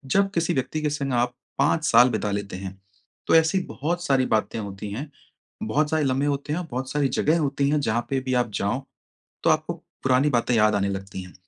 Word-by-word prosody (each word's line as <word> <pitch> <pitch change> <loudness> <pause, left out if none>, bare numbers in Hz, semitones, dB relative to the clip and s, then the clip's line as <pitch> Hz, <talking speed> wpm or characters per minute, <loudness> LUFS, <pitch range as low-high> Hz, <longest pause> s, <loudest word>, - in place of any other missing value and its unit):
जब 195 0 +4
किसी 170 +1 0
व्यक्ति 135 +4 -2
के 150 - +1
संग 140 -2 -2
आप 120 0 +1 0.2
5 150 +3 +2
साल 125 - +6
बिता 105 -3 -1
लेते 100 -2 -3
हैं, 95 0 -8 0.5
तो - - +4
ऐसी 160 +3 +4
बहुत 170 +4 -2
सारी 135 -2 +3
बातें 110 +1 0
होती 100 0 -6
हैं, 140 +8 -5 0.5
बहुत 145 +8 +1
सारे 155 -1 +1
लम्हे 135 +1 +1
होते 145 +1 -1
हैं 175 - -1
और 175 - -6
बहुत 130 +2 -3
सारी 145 -2 +1
जगह 160 +3 +3
होती 140 -2 0
हैं 150 0 +2
जहाँ 120 -2 0
पे 135 - +1
भी 130 0 -2
आप 115 - -11
जाओ, 115 +7 -1 0.6
तो - - +4
आपको - - +1 0.3
पुरानी 130 +3 +3
बातें 120 -1 +1
याद 105 -1 +4
आने 100 0 +1
लगती 95 -1 -5
हैं। 90 - -13
130 Hz, 220 wpm, -24 LUFS, 110-150 Hz, 0.6 s, साल